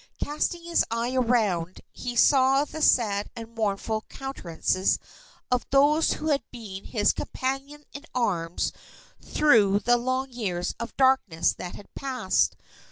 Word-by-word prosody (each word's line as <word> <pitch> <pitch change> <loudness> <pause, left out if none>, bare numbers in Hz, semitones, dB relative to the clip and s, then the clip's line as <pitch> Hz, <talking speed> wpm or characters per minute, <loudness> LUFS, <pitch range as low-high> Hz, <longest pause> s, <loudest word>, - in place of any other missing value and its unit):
Casting 305 +3 -2
his 340 0 +2
eye 230 +2 -1
around, 215 -9 +1
he 245 -1 -6
saw 270 +2 +5
the 315 - -8
sad 210 -8 +3
and 230 0 -9
mournful 215 0 -1
countenances 185 -8 -1 0.5
of 250 0 +2
those 290 +4 +4
who 310 - -3
had 285 -2 +2
been 205 -6 -9
his 210 -3 +2
companions 275 +3 -4
in 285 +2 -9
arms 175 -8 -1 0.5
through 215 -10 +4
the 240 +3 +3
long 255 +2 -2
years 185 -7 -2
of 235 0 -6
darkness 260 -11 +3
that 180 - -7
had 205 - -14
passed. 255 -8 0
240 Hz, 135 wpm, -26 LUFS, 205-270 Hz, 0.5 s, saw